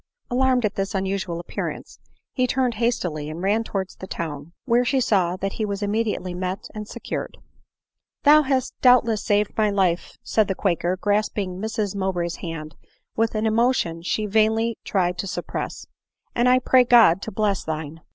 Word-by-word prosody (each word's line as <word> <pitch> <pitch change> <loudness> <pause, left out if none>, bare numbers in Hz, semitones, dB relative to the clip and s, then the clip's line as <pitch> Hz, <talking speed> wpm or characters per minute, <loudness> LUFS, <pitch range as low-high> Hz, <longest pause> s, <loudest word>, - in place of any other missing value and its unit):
Alarmed 255 -1 +2
at 210 - 0
this 195 +1 -3
unusual 190 -3 -2
appearance, 175 - -6 0.3
he 255 -1 +1
turned 255 -1 +1
hastily 175 -11 -1
and 165 +3 -6
ran 210 +4 +2
towards 195 -4 -4
the 190 - -9
town, 155 -3 -5
where 245 -1 +3
she 265 +2 +1
saw 190 -7 +2
that 195 +1 -3
he 220 - -3
was 200 -1 -3
immediately 205 -3 -1
met 185 +2 -4
and 210 -1 -6
secured. - - -5 0.4
" - - -64
Thou 300 +1 +7
hast 265 -3 0
doubtless 235 -4 +4
saved 210 -1 +1
my 215 -1 +2
life," 185 -4 0
said 220 -3 +2
the 195 - -1
quaker, 180 -1 0
grasping 205 -1 -1
Mrs 215 -2 -2
Mowbray's 180 -3 -2
hand* 155 -3 -7 0.4
with 225 0 0
an 215 +1 0
emotion 225 -6 +2
which 165 +1 -9
she 215 - 0
vainly 220 +2 +1
tried 180 -2 0
to 195 - -2
suppress; - - -5 0.3
" - - -48
and 240 +1 +3
I 255 - +6
pray 255 0 +4
God 230 -7 +6
to 220 - -5
bless 205 -1 0
thine!" 160 0 -5
205 Hz, 180 wpm, -23 LUFS, 180-230 Hz, 0.4 s, Thou